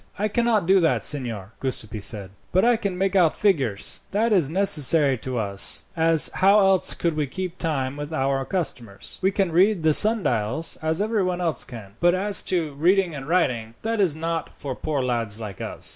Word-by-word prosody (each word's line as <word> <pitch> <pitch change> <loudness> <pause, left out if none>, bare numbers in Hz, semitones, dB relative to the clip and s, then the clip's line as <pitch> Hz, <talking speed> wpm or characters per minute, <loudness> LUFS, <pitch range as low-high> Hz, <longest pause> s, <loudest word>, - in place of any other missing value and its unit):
"I 210 +1 -1
cannot 230 -3 +1
do 190 +2 +4
that, 165 -3 +1
signor," 115 -9 -3
Giuseppi 110 -5 -4
said, 100 -3 -4 0.2
"but 185 +4 +2
I 240 0 +4
can 200 -5 -4
make 195 +1 -1
out 175 -5 +3
figures. 135 - 0
That 220 +3 0
is 170 -8 +2
necessary 155 -6 +3
to 130 0 -5
us, 100 -3 +3
as 165 -1 +4
how 195 +3 +4
else 195 -2 +2
could 170 -1 -1
we 150 -2 -2
keep 185 +4 -6
time 140 -4 -3
with 145 +1 -7
our 135 -3 -1
customers? 125 - -4
We 190 - +2
can 195 -2 -1
read 185 +1 +2
the 155 -1 +3
sundials, 160 - +3
as 160 +4 0
everyone 195 -5 -1
else 170 -3 -2
can; 110 -5 -12
but 175 +1 +3
as 200 +2 0
to 165 -5 -1
reading 175 +4 +1
and 135 -1 -8
writing, 120 -10 -1
that 225 -1 -1
is 175 -6 +2
not 165 +1 -4
for 140 -2 -7
poor 145 -2 -3
lads 115 -4 -2
like 105 -4 -8
us." - - -5
160 Hz, 190 wpm, -23 LUFS, 130-190 Hz, 0.2 s, do